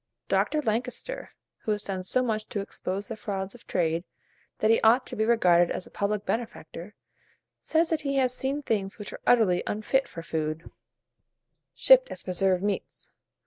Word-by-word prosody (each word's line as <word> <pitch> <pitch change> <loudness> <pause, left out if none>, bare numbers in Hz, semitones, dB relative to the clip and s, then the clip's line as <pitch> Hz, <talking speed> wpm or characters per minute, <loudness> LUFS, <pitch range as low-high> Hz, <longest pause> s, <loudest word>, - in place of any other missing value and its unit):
Dr. 305 -1 +1
Lankester, 250 - -3 0.3
who 215 - -2
has 210 - -3
done 190 -2 -3
so 255 +8 +3
much 215 -3 -2
to 205 - -3
expose 195 0 -4
the 225 - -4
frauds 195 -3 -4
of 245 - -16
trade, 165 -1 0 0.5
that 215 - +3
he 225 - +4
ought 235 +4 +5
to - - -5
be 220 - +1
regarded 180 -7 +4
as 185 - -4
a - - -16
public 205 0 -1
benefactor, 210 -5 -5 0.6
says 325 +1 +1
that 320 - +1
he 275 -1 -2
has 255 -2 +2
seen 275 +3 -2
things 200 -6 -1
which 210 -2 -7
were - - -9
utterly 210 -7 +4
unfit 240 +6 0
for 165 - -8
food, 155 0 -3 1.0
shipped - - +6
as - - -4
preserved 185 0 +1
meats. 205 -1 -4
215 Hz, 175 wpm, -27 LUFS, 185-250 Hz, 1.0 s, shipped